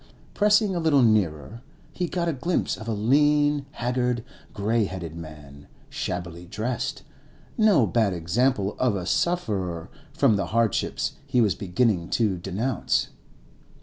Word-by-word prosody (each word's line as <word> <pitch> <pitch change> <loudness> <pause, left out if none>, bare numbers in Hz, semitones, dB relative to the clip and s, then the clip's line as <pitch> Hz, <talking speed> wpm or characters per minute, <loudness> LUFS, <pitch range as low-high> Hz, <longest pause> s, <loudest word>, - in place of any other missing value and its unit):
Pressing 210 -1 +3
a - - 0
little 155 -5 +4
nearer, 105 - +1 0.3
he 180 - -2
got 170 0 -2
a 165 - +1
glimpse 165 +6 -1
of 110 - -10
a - - -1
lean, 145 +6 +2
haggard, 125 -1 -1 0.3
grey 110 +2 0
headed 90 -4 -6
man, 75 -3 -11 0.2
shabbily 90 -1 -5
dressed, 110 +6 -3 0.5
no 205 - +4
bad 110 -3 +1
example 100 +4 0
of 125 -5 +2
a 90 -3 -3
sufferer 95 - -1 0.2
from 105 - +3
the 95 -3 -2
hardships 115 0 0
he 125 - +1
was 105 -6 +3
beginning 95 -1 0
to 105 -6 +1
denounce. 100 +7 -1
110 Hz, 135 wpm, -25 LUFS, 90-135 Hz, 0.5 s, little